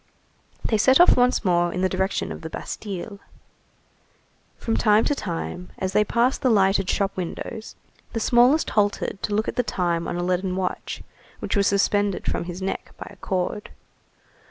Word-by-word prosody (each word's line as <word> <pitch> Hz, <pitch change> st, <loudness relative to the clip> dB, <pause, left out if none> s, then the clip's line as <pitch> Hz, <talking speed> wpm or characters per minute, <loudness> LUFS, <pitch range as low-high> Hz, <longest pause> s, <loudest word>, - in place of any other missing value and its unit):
They 220 Hz, -, +1 dB
set 260 Hz, +7 st, +5 dB
off 350 Hz, -, +7 dB
once 250 Hz, -2 st, +2 dB
more 175 Hz, -1 st, +2 dB
in 180 Hz, -, -3 dB
the 185 Hz, -, +3 dB
direction 190 Hz, +1 st, -1 dB
of -, -, -7 dB
the 160 Hz, -, -6 dB
Bastille. 200 Hz, +3 st, -6 dB, 1.4 s
From 225 Hz, -, -2 dB
time 215 Hz, 0 st, +4 dB
to -, -, +2 dB
time, 180 Hz, -5 st, -5 dB
as 190 Hz, 0 st, -3 dB
they 210 Hz, -, +4 dB
passed 235 Hz, +4 st, +1 dB
the 260 Hz, -, +3 dB
lighted 195 Hz, -3 st, +3 dB
shop 200 Hz, -1 st, 0 dB
windows, 205 Hz, +5 st, -6 dB, 0.4 s
the 225 Hz, -, -1 dB
smallest 245 Hz, +7 st, +4 dB
halted 205 Hz, -1 st, 0 dB
to 205 Hz, -, -1 dB
look 215 Hz, +1 st, 0 dB
at -, -, -4 dB
the -, -, +4 dB
time 170 Hz, -6 st, -1 dB
on -, -, -3 dB
a 175 Hz, -, -2 dB
leaden 185 Hz, +1 st, -1 dB
watch 185 Hz, -1 st, -4 dB, 0.3 s
which -, -, -3 dB
was 200 Hz, -1 st, +3 dB
suspended 200 Hz, 0 st, +1 dB
from -, -, -2 dB
his 180 Hz, +2 st, -6 dB
neck 195 Hz, -, -4 dB
by -, -, -8 dB
a -, -, -14 dB
cord. 185 Hz, +3 st, -3 dB
200 Hz, 180 wpm, -24 LUFS, 180-220 Hz, 1.4 s, off